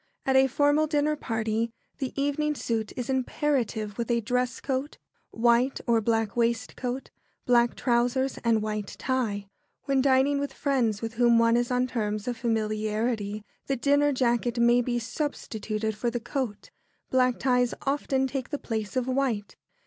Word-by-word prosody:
At 265 - +2
a 265 0 +6
formal 290 +3 +3
dinner 300 0 +1
party 225 -3 -1 0.3
the 265 -3 -2
evening 295 +2 0
suit 225 -5 -2
is 245 -2 -3
imperative, 255 -5 -1
with 235 -1 0
dress 250 0 0
coat, 270 +1 -3 0.3
white 235 +3 +2
or 230 -2 +3
black 225 -1 0
waistcoat, 240 +2 -1 0.3
black 240 -1 +3
trousers, 245 +2 +1
and 225 -2 +2
white 210 -2 -4
tie. 220 -6 -1 0.4
When 275 -1 +2
dining 275 +1 +3
with 285 -1 -3
friends 235 -7 0
with 225 0 -3
whom 235 0 +4
one 230 0 +4
is 240 0 +1
on 250 0 +2
terms 215 -3 -2
of 245 - -1
familiarity, 215 -1 -1 0.2
the 275 - +1
dinner 285 +3 +3
jacket 240 -2 +1
may 240 +1 +5
be 240 0 -1
substituted 220 -4 -3
for 235 +3 -1
the 240 +1 -3
coat. 245 -3 -4 0.4
Black 255 -1 +3
ties 250 -2 +2
often 275 -1 0
take 265 -1 -3
the 290 - -2
place 220 -5 -4
of 255 -1 0
white. 255 -6 -1
240 Hz, 155 wpm, -27 LUFS, 225-265 Hz, 0.4 s, a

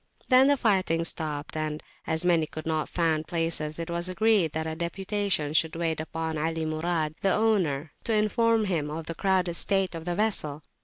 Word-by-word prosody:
Then 260 +1 +7
the 285 0 +4
fighting 185 -8 +2
stopped, 155 -3 -3
and, 155 -1 -3 0.2
as 160 +2 0
many 165 -3 +3
could 155 +1 -8
not 160 -1 -1
find 160 -3 0
places, 165 -2 -1
it 170 0 -5
was 170 +1 -2
agreed 200 -4 +3
that 160 0 -2
a 160 - -3
deputation 185 -2 -1
should 160 0 +1
wait 165 -2 -1
upon 160 0 -3
Ali 160 +1 -1
Murad, 155 0 -1
the 195 - +2
owner, 170 -10 +1
to 230 - +1
inform 220 +1 +2
him 165 -6 -1
of 160 +1 -5
the 165 - -4
crowded 185 0 +1
state 195 +2 +1
of 165 -1 -7
the 175 -1 -1
vessel. 155 -9 +1
165 Hz, 190 wpm, -27 LUFS, 155-195 Hz, 0.2 s, Then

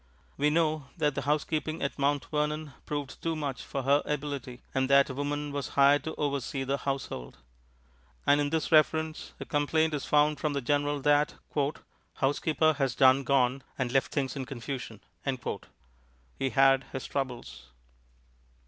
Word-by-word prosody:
We 145 +1 +2
know 155 -3 +1
that 150 -1 +1
the 140 - -2
housekeeping 155 +1 -1
at 140 - -3
Mount 140 0 +1
Vernon 150 -1 -1
proved 145 -2 -4
too 165 -1 -1
much 145 -4 -3
for 135 - -4
her 140 +2 +4
ability, 140 -4 -4
and 130 0 +1
that 140 0 +5
a - - -5
woman 145 +1 -2
was 140 -2 -3
hired 140 +1 +6
to 160 - -4
oversee 140 -2 -2
the 135 +1 -1
household. 135 - -4 0.9
And 145 +1 +5
in 145 - 0
this 160 0 -1
reference 155 0 +2
a - - -5
complaint 155 +1 +1
is 145 - -3
found 150 0 +3
from 150 -1 -1
the 140 - 0
General 145 +2 0
that 145 +1 +3 0.8
"housekeeper 155 +3 +2
has 135 -3 +1
done 130 +1 +5
gone 135 -1 +2 0.2
and 130 -2 -1
left 135 0 +1
things 135 -3 -1
in 135 -2 -4
confusion." 125 -3 -6 1.4
He 135 - +1
had 135 0 +4
his 130 -3 -6
troubles. 120 - -5
140 Hz, 155 wpm, -29 LUFS, 135-150 Hz, 1.4 s, hired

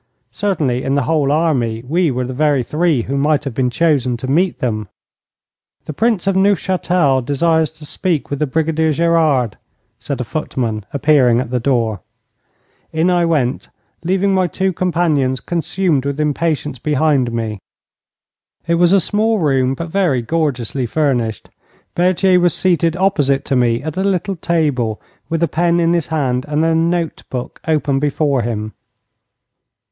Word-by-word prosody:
Certainly 150 -9 -1
in 135 - 0
the 140 - +1
whole 150 -1 +1
army 130 -8 0
we 170 +3 +1
were 125 -1 -2
the 130 - -5
very 145 -1 +1
three 150 -2 0
who 135 - -3
might 145 +1 +1
have 135 -4 -5
been 125 +1 0
chosen 130 -4 +1
to 130 - -6
meet 170 +7 +1
them. 110 -4 -2 1.0
'The 155 - -5
Prince 220 +1 0
of 195 -1 +1
Neufchâtel 180 -7 +2
desires 160 +4 +1
to 155 -1 -13
speak 160 0 -2
with 140 - -2
the 150 - 0
Brigadier 160 +2 0
Gerard,' 155 -8 +1 0.4
said 140 - -4
a - - -1
footman, 115 -6 -3
appearing 140 -5 +3
at 125 -1 -4
the 125 - 0
door. 115 -5 0 0.9
In 165 +3 +1
I 175 -1 +2
went, 140 -6 -1 0.3
leaving 190 +3 +1
my 185 -1 +2
two 190 +3 -1
companions 160 -8 0
consumed 170 -1 -1
with 140 +1 -3
impatience 150 -2 -1
behind 145 -3 +1
me. 110 -3 -3 1.1
It 170 0 +1
was 175 +1 +5
a 195 - +6
small 215 +5 +1
room, 135 -6 +1
but 170 +4 -6
very 160 -9 +1
gorgeously 130 -3 -1
furnished. 120 -6 -1 0.4
Berthier 180 +1 +3
was 175 -3 +2
seated 170 -2 +1
opposite 150 -8 +1
to 135 - 0
me 120 0 +1
at 155 -1 -5
a 190 - 0
little 195 0 -1
table, 145 -10 -1 0.3
with 165 0 0
a - - +3
pen 170 +3 +1
in 170 0 +2
his 170 -4 0
hand 130 -6 -1
and 150 +2 0
a 165 - +2
note 165 0 0
book 125 -1 -6
open 150 -3 +1
before 145 -2 0
him. 110 -2 -4
150 Hz, 160 wpm, -17 LUFS, 130-170 Hz, 1.1 s, a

